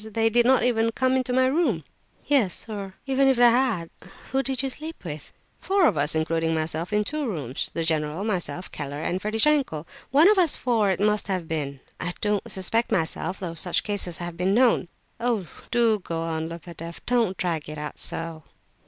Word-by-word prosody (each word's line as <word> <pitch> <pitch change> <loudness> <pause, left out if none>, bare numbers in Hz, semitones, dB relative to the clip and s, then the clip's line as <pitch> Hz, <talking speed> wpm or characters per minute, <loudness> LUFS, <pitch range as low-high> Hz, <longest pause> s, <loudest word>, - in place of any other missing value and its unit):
They 225 0 +2
did 240 +1 +4
not 260 -3 +4
even 230 -2 +2
come 260 +1 +2
into 255 -1 0
my 260 +1 +4
room." 260 - +1 0.4
"Yes, 255 -11 +2
or 200 -3 -6
even 270 0 +3
if 265 -2 +4
they 240 -1 +7
had! 230 -9 +1
But 180 - -16 0.2
who 270 - +2
did 265 0 +1
sleep 285 - -4
with 150 -2 -7
you?" - - -38 0.2
"Four 390 -2 +2
of 215 - +3
us, 150 +1 +1
including 165 +1 0
myself, 160 +3 -2
in 210 0 +2
two 300 +5 -3
rooms. 145 - -3
The 165 - 0
general, 155 +2 -1
myself, 180 -5 -3
Keller, 145 0 -5
and 180 +4 -2
Ferdishenko. 220 - +2 0.2
One 295 +6 +6
of 415 -1 +5
us 340 -5 +4
four 225 -5 +1
it 185 - 0
must 210 0 +2
have 185 -4 -2
been. 140 -4 -3 0.2
I 175 0 -1
don't 210 -2 -1
suspect 225 +5 +1
myself, 165 +1 -1
though 175 -3 -4
such 170 +1 0
cases 200 -5 -2
have 175 -1 -5
been 185 +3 +1
known." 240 -6 +4 0.3
"Oh! 230 -5 0 0.2
do 230 -3 +3
go 165 -3 -4
on, 160 -1 -2
Lebedeff! 170 -1 -9
Don't 230 -6 +2
drag 165 -4 -2
it 155 - -6
out 150 0 -6
so." 165 -1 -4
195 Hz, 195 wpm, -25 LUFS, 165-245 Hz, 0.4 s, they